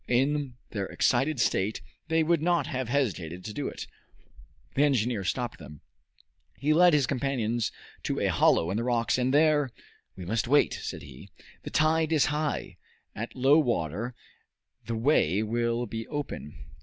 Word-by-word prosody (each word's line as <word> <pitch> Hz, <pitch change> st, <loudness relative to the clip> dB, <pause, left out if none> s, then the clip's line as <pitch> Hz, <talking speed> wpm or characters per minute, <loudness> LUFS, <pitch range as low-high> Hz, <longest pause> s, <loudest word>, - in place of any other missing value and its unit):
In 135 Hz, +1 st, +1 dB, 0.2 s
their 100 Hz, -3 st, -3 dB
excited 135 Hz, +3 st, +1 dB
state 105 Hz, -2 st, +1 dB, 0.3 s
they 160 Hz, 0 st, +2 dB
would 165 Hz, 0 st, +2 dB
not 170 Hz, -3 st, +2 dB
have 130 Hz, -4 st, -3 dB
hesitated 90 Hz, -, -1 dB
to 105 Hz, -, -5 dB
do 145 Hz, -, -3 dB
it. -, -, -6 dB, 0.9 s
The 140 Hz, -, +1 dB
engineer 120 Hz, -7 st, +2 dB
stopped 120 Hz, +4 st, -2 dB
them. 75 Hz, -2 st, -12 dB, 0.8 s
He 150 Hz, +2 st, +2 dB
led 175 Hz, +1 st, +6 dB
his 145 Hz, -3 st, +4 dB
companions 125 Hz, -4 st, -1 dB, 0.3 s
to -, -, -1 dB
a -, -, +1 dB
hollow 85 Hz, +2 st, +3 dB
in 100 Hz, -, -1 dB
the 115 Hz, -, -1 dB
rocks, 120 Hz, 0 st, +1 dB
and 125 Hz, +1 st, +1 dB
there 150 Hz, -1 st, +4 dB, 0.5 s
"We 90 Hz, -, -8 dB
must 110 Hz, +4 st, -1 dB
wait," 145 Hz, +3 st, +4 dB
said -, -, -6 dB
he. 70 Hz, -2 st, -12 dB, 0.3 s
"The -, -, -7 dB
tide 160 Hz, +1 st, +2 dB
is 155 Hz, -3 st, +4 dB
high. 150 Hz, -1 st, -2 dB, 0.4 s
At 115 Hz, +3 st, -6 dB
low 135 Hz, +4 st, +5 dB
water 115 Hz, -, -1 dB, 0.7 s
the 115 Hz, -, -2 dB
way 110 Hz, -, +2 dB
will 115 Hz, +2 st, 0 dB
be 115 Hz, 0 st, -6 dB
open." 145 Hz, -, -5 dB
125 Hz, 160 wpm, -28 LUFS, 110-145 Hz, 0.9 s, led